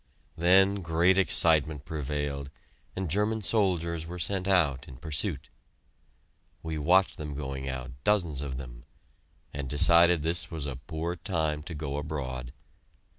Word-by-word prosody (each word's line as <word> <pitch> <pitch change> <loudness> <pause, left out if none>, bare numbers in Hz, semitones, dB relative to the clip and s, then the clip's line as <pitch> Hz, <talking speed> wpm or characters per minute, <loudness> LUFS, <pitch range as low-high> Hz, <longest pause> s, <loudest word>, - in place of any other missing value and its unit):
Then 95 +3 +4
great 85 +3 +3
excitement 80 -5 +3
prevailed, 75 -2 -3 0.5
and 95 -1 -2
German 105 +5 0
soldiers 85 -4 0
were 90 +1 -6
sent 95 +2 -1
out 75 -9 +2
in - - -10
pursuit. 75 - -2 1.1
We 80 -1 -3
watched 90 +6 +3
them 75 -2 -6
going 65 -2 -4
out, 65 -1 -5
dozens 85 -9 +1
of 70 -3 -4
them, - - -9 0.7
and 70 -2 -4
decided 85 +3 +4
this 85 +2 -1
was 80 -4 -5
a 70 -4 -4
poor 80 +5 -4
time 80 -5 -1
to 80 +1 -7
go 70 -1 -4
abroad. 65 -5 -4
80 Hz, 135 wpm, -28 LUFS, 70-90 Hz, 1.1 s, Then